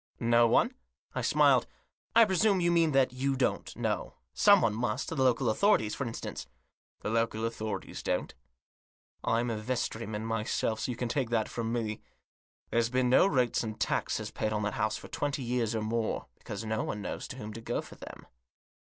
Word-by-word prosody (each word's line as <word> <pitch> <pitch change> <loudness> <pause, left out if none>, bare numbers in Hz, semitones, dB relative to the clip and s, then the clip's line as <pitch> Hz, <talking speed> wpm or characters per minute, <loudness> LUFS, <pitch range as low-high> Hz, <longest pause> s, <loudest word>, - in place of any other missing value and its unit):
" - - -43 0.2
No 120 0 +6
one? 230 - +3 0.2
" - - -43
I - - -2
smiled. - - +4 0.2
" - - -50
I 230 0 +8
presume 195 0 +3
you 175 -1 +2
mean 165 -2 +3
that 135 -2 +3
you 135 +2 0
don't 130 - -1
know. - - -2 0.2
Someone 200 - +5
must; 110 -1 -2
the - - -4
local 130 -1 +3
authorities, 110 - +3
for 140 - -3
instance." 115 - -6 0.5
"The 105 - -3
local 115 -1 0
authorities 110 -4 -4
don't. - - -2 0.9
I'm 115 +1 +1
a 110 - -2
vestryman 110 -2 -3
myself, 115 0 -1
so - - -2
you 120 - -5
can 125 - -2
take 125 0 -1
that 115 -2 +1
from 115 -1 -3
me. 110 -3 -2 0.7
There's 115 0 +2
been 125 0 +1
no 130 - +6
rates 125 -9 +2
and 110 -1 -5
taxes - - -1
paid 110 - -2
on 105 -1 -1
that 100 0 -1
house 110 0 0
for - - -10
twenty 145 -2 -2
years 120 -2 0
or 110 - -1
more; 110 0 -1
because 100 +2 -6
no 110 0 -1
one 105 -1 -4
knows - - -5
to - - -7
whom 110 -4 -7
to 115 - -8
go 120 +1 -2
for - - -8
them." - - -11
115 Hz, 200 wpm, -30 LUFS, 110-130 Hz, 0.9 s, I